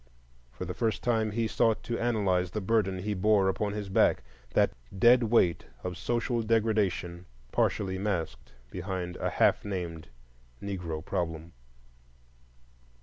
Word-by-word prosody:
For -, -, -6 dB
the -, -, -4 dB
first 110 Hz, -1 st, -1 dB
time 110 Hz, -2 st, +1 dB
he 115 Hz, +2 st, -1 dB
sought 110 Hz, 0 st, +1 dB
to 120 Hz, -, -3 dB
analyze 100 Hz, -6 st, +1 dB
the 105 Hz, -, -3 dB
burden 95 Hz, -2 st, +1 dB
he 105 Hz, +3 st, -2 dB
bore 100 Hz, 0 st, +3 dB
upon 100 Hz, +2 st, -1 dB
his 105 Hz, -1 st, -4 dB
back, 95 Hz, -, +3 dB, 0.3 s
that -, -, +4 dB, 0.3 s
dead 120 Hz, +5 st, +6 dB
weight 110 Hz, -7 st, +2 dB, 0.2 s
of 90 Hz, 0 st, -4 dB
social 120 Hz, +5 st, -1 dB
degradation 105 Hz, -6 st, 0 dB, 0.2 s
partially 95 Hz, -2 st, 0 dB
masked 85 Hz, -11 st, -3 dB, 0.2 s
behind 90 Hz, -1 st, -4 dB
a -, -, -1 dB
half -, -, +3 dB
named 90 Hz, -5 st, -5 dB, 0.5 s
Negro 90 Hz, -6 st, -5 dB
problem. 80 Hz, -1 st, -3 dB
100 Hz, 135 wpm, -29 LUFS, 90-110 Hz, 0.5 s, dead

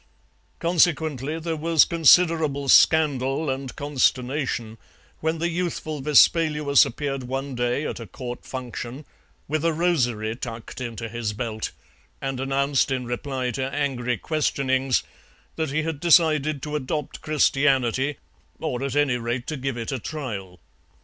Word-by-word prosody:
Consequently 160 Hz, -4 st, +1 dB
there 165 Hz, 0 st, -3 dB
was 160 Hz, 0 st, +4 dB
considerable 160 Hz, -3 st, +4 dB
scandal 140 Hz, 0 st, +4 dB
and 130 Hz, -1 st, -5 dB
consternation 130 Hz, -4 st, -1 dB, 0.4 s
when 160 Hz, +1 st, -1 dB
the 170 Hz, +2 st, 0 dB
youthful 165 Hz, -3 st, -3 dB
Vespaluus 150 Hz, -1 st, +4 dB
appeared 135 Hz, +2 st, -3 dB
one 135 Hz, +2 st, -4 dB
day 120 Hz, +4 st, -1 dB
at -, -, -4 dB
a 115 Hz, -, -8 dB
Court 120 Hz, +5 st, -7 dB
function 130 Hz, +2 st, -6 dB, 0.4 s
with 155 Hz, +1 st, -1 dB
a 165 Hz, -, +3 dB
rosary 125 Hz, -10 st, 0 dB
tucked 115 Hz, 0 st, -7 dB
into 115 Hz, -2 st, -5 dB
his 115 Hz, -2 st, -3 dB
belt, 110 Hz, -1 st, -3 dB, 0.5 s
and 135 Hz, -1 st, -3 dB
announced 135 Hz, +1 st, +1 dB
in 130 Hz, -2 st, -2 dB
reply 125 Hz, +1 st, -3 dB
to 130 Hz, +3 st, -3 dB
angry 125 Hz, -4 st, -1 dB
questionings 135 Hz, -2 st, 0 dB, 0.5 s
that 160 Hz, -2 st, -2 dB
he 155 Hz, +3 st, 0 dB
had 160 Hz, -3 st, -3 dB
decided 155 Hz, -4 st, +3 dB
to 150 Hz, 0 st, -4 dB
adopt 150 Hz, +1 st, -3 dB
Christianity, 135 Hz, -2 st, +2 dB, 0.4 s
or 125 Hz, -, -3 dB
at 140 Hz, 0 st, -3 dB
any 145 Hz, -4 st, +2 dB
rate 120 Hz, +1 st, -3 dB
to 155 Hz, -, -4 dB
give 135 Hz, -2 st, -3 dB
it 115 Hz, -1 st, -4 dB
a 135 Hz, -, -2 dB
trial. 105 Hz, -, -6 dB
135 Hz, 135 wpm, -24 LUFS, 125-155 Hz, 0.5 s, was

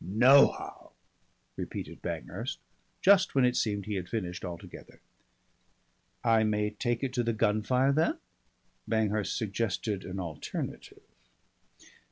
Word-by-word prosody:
"Nohow," 125 Hz, +9 st, +4 dB, 0.6 s
repeated -, -, -6 dB
Banghurst -, -, -4 dB, 0.5 s
just 195 Hz, -4 st, +5 dB
when 135 Hz, -2 st, +5 dB
it 125 Hz, 0 st, +2 dB
seemed 100 Hz, -3 st, 0 dB
he 105 Hz, -, -4 dB
had 90 Hz, -2 st, -4 dB
finished 90 Hz, -6 st, -4 dB
altogether. 85 Hz, -2 st, -9 dB, 1.2 s
"I 115 Hz, -2 st, +4 dB
may 105 Hz, -1 st, 0 dB
take 120 Hz, +3 st, -2 dB
it 130 Hz, -2 st, -2 dB
to 125 Hz, -2 st, +1 dB
the 115 Hz, 0 st, 0 dB
Gunfire 115 Hz, +5 st, +2 dB
then?" 155 Hz, +4 st, +1 dB, 0.7 s
Banghurst 110 Hz, -2 st, 0 dB
suggested 105 Hz, -2 st, -2 dB
an 95 Hz, +1 st, -6 dB
alternative. 85 Hz, -4 st, -6 dB
110 Hz, 115 wpm, -29 LUFS, 100-125 Hz, 1.2 s, just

